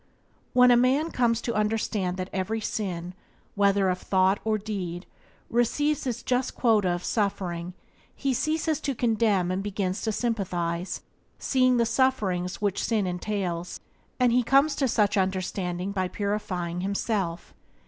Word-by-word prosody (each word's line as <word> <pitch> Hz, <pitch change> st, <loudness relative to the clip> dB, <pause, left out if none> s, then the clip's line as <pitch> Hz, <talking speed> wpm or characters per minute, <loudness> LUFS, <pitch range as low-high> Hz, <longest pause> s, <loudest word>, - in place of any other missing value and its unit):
When 250 Hz, 0 st, +7 dB
a -, -, +7 dB
man 265 Hz, +7 st, +2 dB
comes 235 Hz, -2 st, +1 dB
to 235 Hz, -, -2 dB
understand 210 Hz, -3 st, 0 dB
that 185 Hz, 0 st, -5 dB
every 200 Hz, +4 st, -1 dB
sin, 180 Hz, -5 st, -3 dB, 0.4 s
whether 200 Hz, -1 st, +3 dB
of 180 Hz, 0 st, 0 dB
thought 190 Hz, +1 st, +2 dB
or 220 Hz, -1 st, +1 dB
deed, 190 Hz, -4 st, -5 dB, 0.4 s
receives 275 Hz, +5 st, +1 dB
its 245 Hz, -1 st, -3 dB
just 255 Hz, 0 st, 0 dB
quota 215 Hz, -6 st, +3 dB
of 175 Hz, 0 st, -2 dB
suffering 180 Hz, -4 st, -2 dB, 0.4 s
he 275 Hz, -2 st, 0 dB
ceases 310 Hz, +4 st, 0 dB
to 275 Hz, -2 st, -2 dB
condemn 220 Hz, -6 st, +2 dB
and 185 Hz, +1 st, -1 dB
begins 195 Hz, -1 st, -2 dB
to 220 Hz, -, -1 dB
sympathize, 180 Hz, -6 st, -2 dB, 0.3 s
seeing 255 Hz, -2 st, +2 dB
the 235 Hz, -, +3 dB
sufferings 215 Hz, -8 st, 0 dB
which 205 Hz, -2 st, 0 dB
sin 220 Hz, -4 st, +1 dB
entails; 180 Hz, -1 st, -3 dB, 0.4 s
and 250 Hz, -1 st, +4 dB
he 250 Hz, +1 st, +4 dB
comes 275 Hz, +5 st, +3 dB
to 270 Hz, -, +2 dB
such 210 Hz, -3 st, +2 dB
understanding 185 Hz, -1 st, -1 dB
by 190 Hz, -2 st, -1 dB
purifying 180 Hz, -4 st, -3 dB
himself. 195 Hz, -3 st, -2 dB
205 Hz, 145 wpm, -26 LUFS, 185-240 Hz, 0.4 s, When